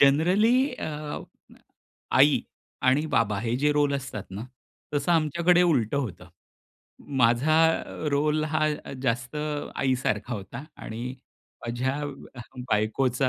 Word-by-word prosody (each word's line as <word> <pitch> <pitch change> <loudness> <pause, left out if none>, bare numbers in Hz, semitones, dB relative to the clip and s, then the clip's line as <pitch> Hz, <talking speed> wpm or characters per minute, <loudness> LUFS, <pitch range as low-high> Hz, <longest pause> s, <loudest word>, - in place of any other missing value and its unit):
Generally 195 - +4
अ, 150 -8 -5 1.0
आई 140 +2 +6 0.4
आणि 135 +5 +3
बाबा 105 -3 +2
हे 115 +1 -1
जे 150 +3 +2
रोल 145 -1 +2
असतात 130 -7 -4
ना 100 +5 -6 0.5
तसं 145 +4 +1
आमच्याकडे 170 +3 +3
उलटं 140 -8 +2
होतं. 95 -9 -5 0.9
माझा 125 +6 +4 0.5
रोल 150 +2 +2
हा 155 0 +1 0.4
जास्त 125 +2 -1 0.4
आई 130 -1 +2
सारखा 110 +3 -1
होता 110 +6 -7 0.2
आणि 110 +1 -6 0.6
माझ्या 125 +3 -1 0.7
बायकोचा 120 +5 +1
140 Hz, 110 wpm, -26 LUFS, 120-155 Hz, 1.0 s, आई